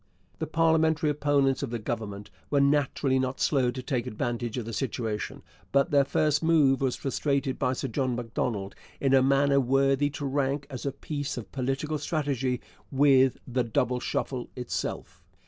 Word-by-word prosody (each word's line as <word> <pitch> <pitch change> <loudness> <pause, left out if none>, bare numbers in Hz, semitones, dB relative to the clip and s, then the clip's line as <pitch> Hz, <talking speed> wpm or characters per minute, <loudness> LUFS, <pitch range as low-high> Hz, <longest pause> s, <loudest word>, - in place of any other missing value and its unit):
The 160 - -2
parliamentary 160 -1 +2
opponents 140 -2 +2
of - - -3
the 120 - -2
Government 105 -3 -5 0.2
were 145 - +2
naturally 140 -1 +2
not 130 0 -2
slow 130 -4 +2
to 130 +1 -5
take 125 -2 -2
advantage 120 +2 -3
of 120 - -3
the 115 - -6
situation, 115 -4 -3 0.3
but 140 +5 +2
their 140 -1 +5
first 150 +1 +1
move 155 -5 +4
was 130 -2 +1
frustrated 140 0 -1
by 125 - +1
Sir 135 - -3
John 130 +1 -1
Macdonald 115 -4 -3 0.3
in 135 -1 +2
a 135 - +6
manner 140 +1 +3
worthy 135 +2 +2
to 145 0 -5
rank 140 +1 0
as 130 +1 -5
a - - 0
piece 145 0 -4
of 120 - -7
political 135 +3 -2
strategy 135 -6 -1 0.3
with 135 -2 +4
the 125 0 0
'Double 125 +2 0
Shuffle' 125 0 -3
itself. 125 -1 -4
135 Hz, 165 wpm, -27 LUFS, 125-145 Hz, 0.3 s, a